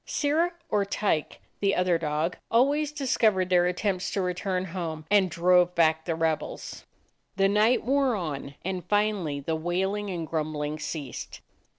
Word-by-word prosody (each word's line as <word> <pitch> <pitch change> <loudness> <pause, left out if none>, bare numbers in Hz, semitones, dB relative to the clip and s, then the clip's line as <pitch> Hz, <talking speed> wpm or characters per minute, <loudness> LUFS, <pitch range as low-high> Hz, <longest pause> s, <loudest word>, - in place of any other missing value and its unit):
Sirrah 320 +4 0
or 205 - +1
Tyke, 200 -5 -1 0.2
the 200 -1 +2
other 180 -2 +2
dog, 155 +2 -1
always 285 +6 +2
discov 255 -7 +2
ered 185 -1 -1
their 180 -1 +4
attempts 185 +1 -1
to 195 - -1
return 180 +1 -2
home 165 -4 -5
and 200 -3 +4
drove 180 +1 +3
back 160 -1 +3
the 165 - -1
rebels. 160 -1 -3 0.5
The 195 0 +3
night 215 +5 +3
wore 270 -1 +2
on, 145 -6 -5
and 185 -1 -3
finally 200 -7 0
the 160 +3 -2
wailing 190 +5 -1
and 170 -3 -3
grumbling 155 -1 -3
ceased. 145 -4 -6
180 Hz, 155 wpm, -27 LUFS, 160-205 Hz, 0.5 s, their